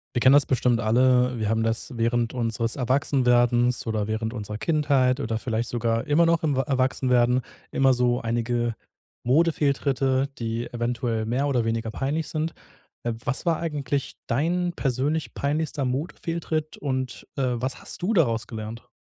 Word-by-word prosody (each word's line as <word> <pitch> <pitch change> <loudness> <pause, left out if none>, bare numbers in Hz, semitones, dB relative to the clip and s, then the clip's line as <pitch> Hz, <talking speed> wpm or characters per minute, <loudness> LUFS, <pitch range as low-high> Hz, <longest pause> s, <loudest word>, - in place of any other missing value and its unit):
Wir - - +2
kennen 130 +2 +6
das 145 +1 +6
bestimmt 125 -2 +2
alle. 125 +2 +3
Wir 110 -2 -1
haben 110 0 +1
das 115 +4 -1
während 115 0 +1
unseres 115 -1 -1
Erwachsenwerdens 125 -2 +2
oder 110 -2 -1
während 110 +1 -2
unserer 105 -3 -5
Kindheit 140 -1 +2
oder 115 -4 -1
vielleicht 115 0 -2
sogar 115 -1 -1
immer 150 +3 +4
noch 165 0 +2
im 150 -4 +1
wa 135 - +2
Erwachsenwerden 130 -2 +2 0.3
immer 135 0 +3
so 125 0 +2
einige 120 0 -1 0.5
Modefehltritte, 140 -2 +2
die 115 0 -3
eventuell 120 -2 -1
mehr 125 +5 0
oder 125 -5 +1
weniger 115 0 -1
peinlich 140 +6 -2
sind. 160 +1 -2 0.5
Äh, 120 - -1
was 140 - -2
war 170 -2 +2
eigentlich 145 -4 -2
dein 175 +8 0
persönlich 140 +3 -1
peinlichster 150 0 -1
Modefehltritt? 155 +3 -3
Und, 130 -3 -3
äh, 135 - -1
was 130 +2 -3
hast - - -7
du 210 +6 +1
daraus 115 - +2
gelernt? 110 +1 -7
125 Hz, 155 wpm, -25 LUFS, 115-140 Hz, 0.5 s, kennen